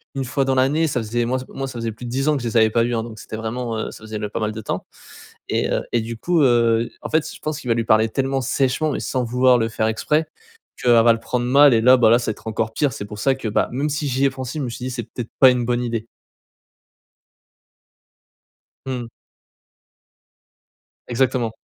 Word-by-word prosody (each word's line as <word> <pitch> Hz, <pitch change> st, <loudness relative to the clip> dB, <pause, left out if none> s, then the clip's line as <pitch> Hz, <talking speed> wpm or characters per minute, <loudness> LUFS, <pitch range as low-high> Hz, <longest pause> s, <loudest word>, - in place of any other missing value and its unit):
1 135 Hz, -, -1 dB
fois 135 Hz, +2 st, 0 dB
dans 135 Hz, -, +1 dB
l'année, 140 Hz, +5 st, +2 dB
ça 135 Hz, -, -1 dB
faisait, 120 Hz, +2 st, -1 dB
moi, 130 Hz, +2 st, -1 dB
ç 130 Hz, -, -8 dB
moi, 135 Hz, 0 st, -5 dB
ça 125 Hz, -3 st, -7 dB
faisait 115 Hz, -1 st, -2 dB
plus 120 Hz, +3 st, -10 dB
de -, -, -5 dB
10 135 Hz, +3 st, -1 dB
ans 150 Hz, -1 st, +3 dB
que 130 Hz, -, -5 dB
je -, -, -2 dB
les 115 Hz, -, 0 dB
avais 110 Hz, -1 st, +5 dB
pas 115 Hz, +1 st, +2 dB
vu, 120 Hz, +1 st, -1 dB
hein. 115 Hz, -, -1 dB
Donc, 115 Hz, -1 st, -9 dB
c'était 110 Hz, -, -7 dB
vraiment, 115 Hz, +1 st, -3 dB
heu, 110 Hz, -, -4 dB
ça -, -, -13 dB
faisait 110 Hz, -1 st, -6 dB
ne 105 Hz, -, -3 dB
pas 105 Hz, -, -5 dB
mal 110 Hz, -1 st, -1 dB
de 110 Hz, +1 st, -7 dB
temps -, -, -4 dB, 0.6 s
et -, -, 0 dB
heu, -, -, +1 dB
et 120 Hz, -, +2 dB
du 115 Hz, +1 st, -6 dB
coup, 170 Hz, +6 st, +1 dB
heu, 115 Hz, -2 st, +3 dB
en -, -, -6 dB
fait, 160 Hz, -1 st, +1 dB
je -, -, -12 dB
pense 155 Hz, -1 st, -3 dB
qu'il 125 Hz, -, -7 dB
va -, -, +4 dB
lui 115 Hz, -1 st, -1 dB
parler 110 Hz, 0 st, +3 dB
tellement 135 Hz, +2 st, -1 dB
sèchement 135 Hz, +4 st, 0 dB
et -, -, -3 dB
sans 130 Hz, -1 st, -1 dB
vouloir 125 Hz, +1 st, +3 dB
le 115 Hz, -1 st, 0 dB
faire 110 Hz, 0 st, -1 dB
exprès 150 Hz, +8 st, 0 dB, 0.5 s
qu'elle 120 Hz, -, +4 dB
va 120 Hz, -, +6 dB
le 115 Hz, -, -4 dB
prendre 120 Hz, +1 st, -2 dB
mal 140 Hz, +2 st, +6 dB
et 115 Hz, -, +3 dB
là, 125 Hz, +3 st, +7 dB
bah, 115 Hz, -3 st, +5 dB
là, 120 Hz, +2 st, +5 dB
ça 120 Hz, -, -2 dB
être 110 Hz, -, -11 dB
encore 110 Hz, 0 st, -2 dB
pire. 145 Hz, +2 st, 0 dB
C'est -, -, -6 dB
pour 105 Hz, 0 st, -9 dB
ça 135 Hz, +5 st, +2 dB
que, 130 Hz, -4 st, -5 dB
bah, 105 Hz, -, +1 dB
même 140 Hz, +4 st, -1 dB
si 150 Hz, 0 st, -2 dB
j'y 135 Hz, 0 st, 0 dB
ai -, -, +4 dB
pensé, 130 Hz, +2 st, -6 dB
je -, -, -2 dB
me -, -, -4 dB
suis 120 Hz, +2 st, -6 dB
dit: 130 Hz, -, -3 dB
«C'est 120 Hz, -1 st, -4 dB
peut-être 115 Hz, +1 st, -7 dB
pas 130 Hz, -1 st, +8 dB
une 125 Hz, -1 st, -1 dB
bonne 120 Hz, 0 st, 0 dB
idée». 115 Hz, -2 st, -2 dB, 2.8 s
Mmh. 125 Hz, -3 st, -4 dB, 2.0 s
Exactement. 125 Hz, -2 st, 0 dB
120 Hz, 250 wpm, -21 LUFS, 115-135 Hz, 2.8 s, pas